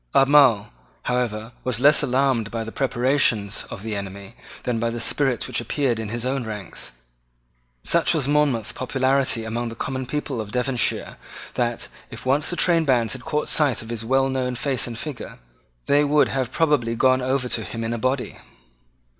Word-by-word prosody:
Albemarle, 135 - +5 0.3
however, 120 -3 -2
was 125 -3 0
less 145 +4 +5
alarmed 130 -5 +1
by 115 0 -3
the 110 - -7
preparations 120 -5 +1
of 95 - -8
the 110 -1 -3
enemy 100 +1 -7 0.3
than 120 -2 -1
by 115 +1 0
the 120 0 -4
spirit 130 0 0
which - - -1
appeared 120 0 -1
in 110 -2 -4
his 120 +2 -3
own 130 0 -1
ranks. 105 - -6 0.9
Such 170 0 +3
was 145 -4 0
Monmouth's 145 -7 +2
popularity 130 -2 0
among 115 +1 -3
the 115 - -8
common 130 +2 -4
people 140 -4 -3
of 105 -1 -8
Devonshire 125 0 0 0.4
that, - - -1 0.2
if - - -9
once 140 +4 +2
the 175 - 0
trainbands 140 -11 +2
had 130 -1 -8
caught 150 0 -1
sight 145 -7 +3
of 110 - -11
his 115 -1 -3
well 135 +3 +2
known 130 -1 -2
face 130 0 -1
and 115 -1 -6
figure, 145 0 -6 0.5
they 145 +1 +4
would 145 0 +3
have 130 -2 -2
probably 145 -8 +1
gone 130 +2 +3
over 130 0 0
to - - 0
him 115 0 -5
in 115 +1 -2
a 120 - -3
body. 130 +2 -2
125 Hz, 180 wpm, -23 LUFS, 115-135 Hz, 0.9 s, Albemarle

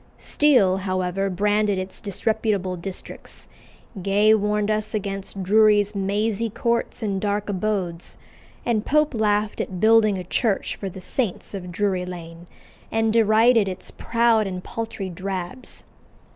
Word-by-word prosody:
Steele, 250 -11 +3
however, 185 0 -1
branded 205 +2 +1
its 185 0 -6
disreputable 200 -2 0
districts; 180 +2 -7 0.5
Gay 205 +3 +4
warned 210 0 +1
us 215 0 -2
against 195 -1 -4
"Drury's 210 +1 +4
mazy 205 +3 -1
courts 235 +2 -1
and 195 -3 -1
dark 205 0 -1
abodes;" 185 -4 -2 0.5
and 225 -3 +1
Pope 300 +2 +2
laughed 210 -1 +1
at 185 -2 -5
building 215 -1 +5
a 185 - -4
church 205 +3 -1
for 195 - -5
"the 190 +1 -10
saints 215 0 -3
of 180 -3 -6
Drury 185 -1 -1
Lane," 170 -1 -9 0.4
and 225 0 +1
derided 225 0 +4
its 185 - -6
proud 230 -2 +2
and 185 -1 -5
paltry 225 -4 -5
"drabs." 190 +6 -6
205 Hz, 130 wpm, -23 LUFS, 190-220 Hz, 0.5 s, building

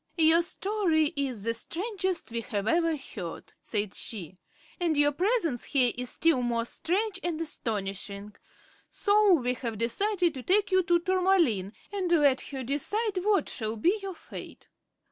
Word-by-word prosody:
"Your 325 +1 +5
story 345 -4 0
is 260 -7 -2
the 230 +1 0
strangest 370 - -2
we 230 0 -2
have 210 -3 -3
ever 330 +1 +2
heard," 190 - -8
said 205 -2 0
she; 185 -4 -4 0.4
"and 335 -4 +1
your 290 0 +4
presence 340 - 0
here 255 -4 +3
is 250 0 -3
still 325 -5 +2
more 235 -1 0
strange 385 - -1
and 340 -2 -2
astonishing. 205 - -4 0.5
So 415 -2 +3
we 250 -5 0
have 235 -3 -5
decided 350 - +1
to 265 - -6
take 395 +8 +2
you 375 0 +5
to 350 -1 +3
Tourmaline 345 - +2 0.2
and 375 -3 -2
let 290 -6 +4
her 270 -2 -5
decide 380 - -1
what 410 -1 +2
shall 220 -3 -3
be 360 - +2
your 385 -2 -6
fate." - - -11
315 Hz, 155 wpm, -28 LUFS, 235-375 Hz, 0.5 s, Your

